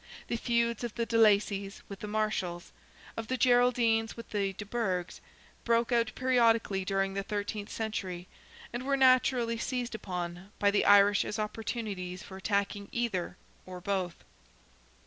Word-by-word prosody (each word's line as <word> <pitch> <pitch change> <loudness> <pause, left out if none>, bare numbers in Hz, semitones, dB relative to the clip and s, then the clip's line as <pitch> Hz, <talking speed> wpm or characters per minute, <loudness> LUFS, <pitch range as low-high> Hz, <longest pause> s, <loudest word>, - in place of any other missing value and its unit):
The - - 0
feuds 235 0 0
of 235 -2 -4
the 235 - -1
de 230 - -3
Lacys 205 -2 +3
with 200 -1 -8
the 210 - -6
Marshals, 205 -5 -2 0.4
of 225 -1 -5
the 260 - -1
Geraldines 245 -3 +3
with 230 - -10
the 200 -2 0
de 210 - -7
Burghs, 190 -5 -2 0.4
broke 235 +1 +2
out 235 -2 +2
periodically 230 -6 +2
during 195 0 0
the 195 - -1
thirteenth 205 +1 -4
century, 190 -5 -4 0.5
and 240 - -3
were 275 +1 0
naturally 255 -3 +3
seized 245 -1 -2
upon, 180 -3 -5
by 205 0 +3
the 205 - +2
Irish 205 0 +6
as 210 - -4
opportunities 210 -4 -4
for 190 - -10
attacking 200 0 -1
either 195 -7 -2 0.3
or 185 -1 -7
both. 185 -2 -2
210 Hz, 150 wpm, -30 LUFS, 195-235 Hz, 0.5 s, Irish